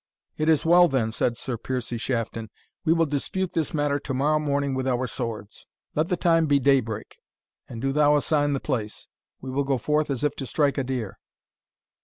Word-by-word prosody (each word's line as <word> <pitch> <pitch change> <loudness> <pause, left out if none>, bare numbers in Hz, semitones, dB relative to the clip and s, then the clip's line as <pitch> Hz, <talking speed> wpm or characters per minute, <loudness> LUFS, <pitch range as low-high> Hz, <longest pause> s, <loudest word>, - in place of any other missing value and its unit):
"It 155 +1 0
is 160 -1 +3
well, 175 +1 +7
then," 125 -7 0
said 115 +1 -1
Sir 125 -1 -4
Piercie 125 -2 -3
Shafton; 115 -2 -3 0.3
"we 160 - +2
will 165 0 +4
dispute 165 +6 -2
this 160 -2 -1
matter 145 -2 0
to 135 - -5
morrow 150 +3 +2
morning 140 -2 0
with 130 0 -2
our 130 0 +1
swords. 115 -4 -6 0.3
Let 155 +3 0
the 180 - +1
time 165 -2 +3
be 145 -1 +4
daybreak, 130 -6 0 0.5
and 115 0 -7
do 135 - +1
thou 150 +1 +4
assign 145 0 +1
the 135 - -1
place. 115 -8 -4 0.3
We 130 - -6
will 140 +2 0
go 135 -1 0
forth 150 +4 0
as 135 0 -2
if 150 -1 +1
to 135 - -5
strike 145 0 +1
a - - 0
deer." 125 -6 -4
140 Hz, 200 wpm, -25 LUFS, 125-150 Hz, 0.5 s, well